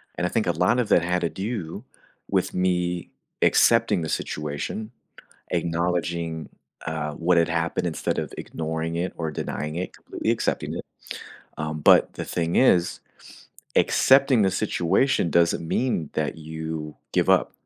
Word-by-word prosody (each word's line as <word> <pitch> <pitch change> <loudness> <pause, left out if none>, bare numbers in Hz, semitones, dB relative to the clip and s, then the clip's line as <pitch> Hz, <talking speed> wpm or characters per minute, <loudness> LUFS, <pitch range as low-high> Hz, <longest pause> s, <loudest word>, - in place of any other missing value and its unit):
And 90 - 0
I - - -4
think 110 - 0
a 85 - +4
lot 90 +9 +2
of 115 - +1
that 85 - +5
had 90 +1 0
to 85 - 0
do, 95 -5 -5 0.5
with - - 0
me 90 -1 0 0.3
accepting 115 -6 +4
the 80 - -3
situation, 75 +9 -4 0.6
acknowledging, 85 -1 -1 0.4
uh, 75 -1 -3
what 85 +3 +1
had 85 - +3
happened 85 +1 -1
instead 80 - -2
of - - -3
ignoring 80 +1 -3
it 90 +2 -2
or 80 -2 -2
denying 75 +1 -4
it, 90 - -3
completely - - -3
accepting - - -1
it. - - -5 0.7
Um, 75 0 -3
but - - +5
the - - -4
thing 85 -1 -1
is, 90 -9 +3 0.8
accepting 135 -3 +5
the 95 - +3
situation 95 +3 +1
doesn't 85 -1 +2
mean 115 - 0
that - - -2
you 80 -1 -6 0.2
give - - +2
up. - - +3
85 Hz, 150 wpm, -25 LUFS, 80-90 Hz, 0.8 s, that